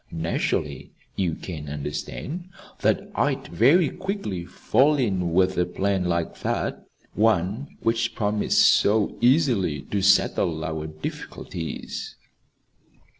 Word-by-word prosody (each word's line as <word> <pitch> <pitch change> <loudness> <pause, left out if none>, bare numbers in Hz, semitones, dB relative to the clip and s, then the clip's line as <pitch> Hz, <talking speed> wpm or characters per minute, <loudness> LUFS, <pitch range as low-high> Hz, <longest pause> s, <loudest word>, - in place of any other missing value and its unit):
Naturally, 80 -3 -2 0.2
you 90 -5 0
can 75 -5 -7
understand 75 - -5 0.3
that - - 0
I'd - - 0
very 150 - +4
quickly 185 - -4
fall 145 +10 +2
in 95 - 0
with 95 +1 +2
a 90 - +3
plan 95 -2 0
like 85 -1 -1
that - - -2 0.3
one 110 - +1
which 115 0 0
promised 105 -1 +2
so 105 0 +3
easily 120 - +3
to 100 - 0
settle 85 -4 +3
our 80 -1 -3
difficulties." 80 +2 -6
95 Hz, 110 wpm, -24 LUFS, 85-115 Hz, 0.3 s, very